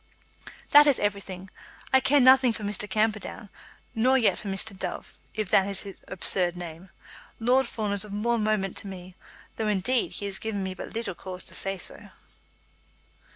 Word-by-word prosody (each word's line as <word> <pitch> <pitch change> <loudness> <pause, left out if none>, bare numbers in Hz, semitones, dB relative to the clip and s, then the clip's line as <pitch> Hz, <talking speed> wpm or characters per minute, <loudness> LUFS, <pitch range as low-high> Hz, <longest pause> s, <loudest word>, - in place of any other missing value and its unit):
"That 295 +1 +8
is 280 - +5
everything. 195 -2 -4 0.4
I 265 - +7
care 285 +2 +3
nothing 260 -1 +6
for 215 - -7
Mr. 205 0 -3
Camperdown; 215 0 -1 0.4
nor 250 +3 +3
yet 235 - +2
for 210 - -8
Mr. 195 +2 -2
Dove, 185 -1 -5 0.2
if 215 -4 -3
that 195 - +4
is 200 -1 0
his 195 -2 -9
absurd 180 -1 +2
name. 175 +1 -9 0.5
Lord 250 +3 +3
Fawn 215 -3 -3
is 200 - +3
of 210 - -10
more 230 +3 0
moment 210 -3 0
to - - -3
me, 185 -1 -9 0.4
though, 220 - -1
indeed, 210 +5 0
he 205 - -4
has 195 -1 -3
given 210 -3 -3
me 190 0 -3
but 185 - -8
little 230 -4 -3
cause 185 +1 -8
to - - -11
say 195 0 -3
so." - - -2
205 Hz, 180 wpm, -26 LUFS, 190-225 Hz, 0.5 s, That